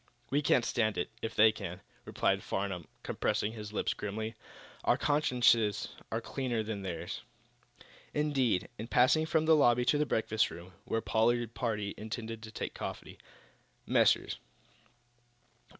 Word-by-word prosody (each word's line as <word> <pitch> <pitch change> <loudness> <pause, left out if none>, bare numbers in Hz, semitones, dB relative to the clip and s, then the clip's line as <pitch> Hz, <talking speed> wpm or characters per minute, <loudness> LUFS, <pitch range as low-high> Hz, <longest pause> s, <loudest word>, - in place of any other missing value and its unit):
"We 145 +2 +3
can 130 -4 +3
stand 110 -3 0
it, - - -2
if 115 - -4
they 110 +1 +7
can," 95 -3 -7 0.2
replied - - +1
Farnum, 95 -4 -3 0.2
compressing 105 - -1
his 105 -2 -7
lips 105 - 0
grimly. 110 +2 -4 0.5
"Our - - +3
consciences 125 -7 +3 0.2
are - - 0
cleaner 120 -4 -2
than 105 -2 -4
theirs." 85 -4 -5 0.9
Indeed, 135 -10 +1
in 110 - -5
passing 130 +7 +4
from 160 -1 +2
the 160 0 +6
lobby 125 -4 +4
to 145 - +3
the 150 - +1
breakfast 110 -1 +1
room, 90 +2 -10
where 115 - -1
the - - -26
Pollard 115 +1 +2
party 105 -5 -2
intended 110 +1 -5
to 110 -1 -9
take - - -4
coffee, - - -7 0.7
Messrs. - - +3
110 Hz, 145 wpm, -32 LUFS, 105-125 Hz, 0.9 s, they